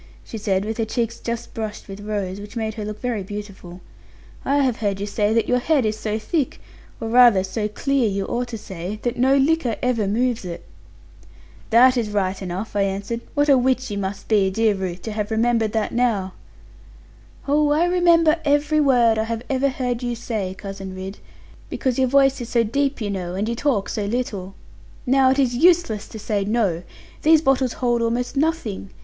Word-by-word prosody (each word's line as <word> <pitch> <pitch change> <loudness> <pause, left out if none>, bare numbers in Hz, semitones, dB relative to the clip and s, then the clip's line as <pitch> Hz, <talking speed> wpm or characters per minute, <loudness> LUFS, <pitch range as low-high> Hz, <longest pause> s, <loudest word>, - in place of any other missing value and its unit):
she - - -9
said, 200 -2 0
with 220 +1 -4
her - - +2
cheeks 230 +1 -2
just 235 0 -5
brushed 215 -2 -5
with 195 0 -8
rose, 205 -2 -3
which 205 +4 -11
made 220 -1 -2
her 215 -1 -6
look 210 0 -6
very 240 -4 -2
beautiful; 195 -3 -8 0.6
'I 280 - +1
have 255 -4 +1
heard 200 -3 -1
you 200 - -2
say 205 0 0
that 225 0 +2
your 250 - +2
head 275 -1 +2
is 215 0 0
so 215 0 -3
thick 270 +6 -2 0.4
or 225 - -4
rather 235 -4 +6
so 210 +3 -2
clear, 260 +2 0
you 195 0 -2
ought 245 +3 -2
to 235 -2 -6
say 190 0 -6
that 240 0 -1
no 265 +3 +3
liquor 275 -4 +2
ever 235 -5 +1
moves 240 +3 0
it.' 175 -2 -7 1.1
'That 255 +3 +6
is 225 -3 0
right 195 -2 -1
enough,' 190 +4 -5
I 200 - +2
answered; 200 +4 -2
'what 290 0 +2
a 275 -3 +6
witch 255 -1 0
you 200 - -2
must 195 +1 -5
be, 205 -3 +3
dear 220 +2 +2
Ruth, 185 -2 -5
to 220 - -4
have 210 0 -3
remembered 225 -1 +1
that 220 -2 0
now!' 215 -6 0 1.1
'Oh, 295 +1 +3
I 305 +4 +3
remember 340 -2 +4
every 295 +1 +2
word 240 -5 +4
I 220 - 0
have 230 0 -4
ever 270 +1 +2
heard 250 -2 -2
you 240 -1 -2
say, 215 -5 -4
Cousin 195 -1 -7
Ridd; 190 +2 -7 0.5
because 260 -1 -1
your 260 - +3
voice 270 0 +3
is 240 - -6
so 235 -2 +3
deep, 275 +4 -1
you 205 -2 -2
know, 180 -2 -4
and 205 +3 -1
you 235 - -1
talk 235 -5 0
so 210 - -3
little. 200 -4 -3 0.5
Now 265 0 +4
it 265 - +2
is 260 -3 +2
useless 325 - +3
to - - -9
say 210 -1 -1
"no". 200 -5 0 0.4
These 315 0 +5
bottles 265 -3 +2
hold 240 -2 0
almost 235 +3 -1
nothing. 275 - -1
225 Hz, 200 wpm, -22 LUFS, 205-255 Hz, 1.1 s, rather